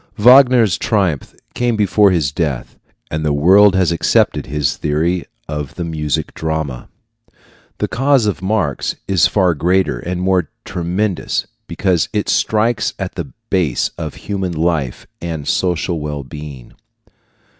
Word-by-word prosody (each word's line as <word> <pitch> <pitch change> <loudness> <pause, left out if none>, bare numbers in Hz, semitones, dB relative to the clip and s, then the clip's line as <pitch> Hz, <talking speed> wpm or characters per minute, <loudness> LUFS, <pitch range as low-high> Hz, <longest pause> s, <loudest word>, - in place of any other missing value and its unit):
Wagner's 125 -3 +6
triumph 95 - -1 0.2
came 120 -1 0
before 105 -1 +4
his 80 -7 +1
death, 75 -6 -3 0.4
and 80 0 -2
the 75 - +1
world 95 +7 +5
has 90 -3 +2
accepted 85 - +1
his 75 0 -1
theory 80 +4 -1 0.2
of 75 -2 -5
the 90 - -4
music 80 -2 -2
drama. 80 -6 -3 0.9
The - - -1
cause 135 -2 +2
of 100 -4 -1
Marx 100 0 -1
is 90 -4 +4
far 95 -3 +2
greater 90 -4 +1
and 90 +5 -4
more 90 -3 +1 0.2
tremendous, 95 +2 -2 0.2
because 90 -4 0
it 105 -1 -1
strikes 110 0 +1
at 95 -2 -4
the 135 - -6 0.2
base 85 -10 +1
of 80 -3 -6
human 95 -3 -2
life 80 -6 -1 0.2
and 80 -4 -5
social 85 -2 0
well 75 -1 -4
being. 70 -3 -10
85 Hz, 135 wpm, -17 LUFS, 75-100 Hz, 0.9 s, Wagner's